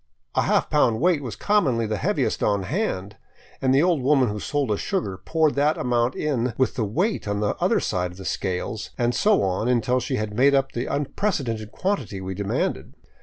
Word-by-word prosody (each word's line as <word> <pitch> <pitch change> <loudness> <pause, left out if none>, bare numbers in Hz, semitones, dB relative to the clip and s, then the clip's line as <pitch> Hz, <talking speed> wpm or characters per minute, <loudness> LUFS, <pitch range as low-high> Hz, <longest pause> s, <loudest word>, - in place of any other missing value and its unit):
A - - +2
half - - +2
pound 110 -1 +3
weight 175 -2 +2
was 125 -5 -5
commonly 140 - +1
the 110 0 -2
heaviest - - 0
on 100 -2 +1
hand, 100 - -2 0.4
and 130 - +2
the 135 +3 +4
old 175 -5 +2
woman 135 -2 +3
who 105 0 -4
sold 140 0 -1
us 105 - 0
sugar 180 - -2
poured 155 - +1
that 145 +2 +2
amount 120 0 0
in 125 -5 -1
with 130 - +2
the 120 - -1
weight 170 - -1
in 105 0 -1
the 105 -1 0
other - - +2
side 90 0 -1
of 90 - -13
the 95 - -9
scales, 95 +3 -3
and 120 0 +1
so 210 - +3
on 95 +4 0
until 125 +1 +2
she 130 - -2
had 105 -3 -3
made 135 +5 +4
up 135 0 +1
the 120 - -3
unprecedented 135 - -2
quantity 185 - -2
we 95 0 -5
demanded. 100 +1 -2
125 Hz, 205 wpm, -24 LUFS, 105-145 Hz, 0.4 s, the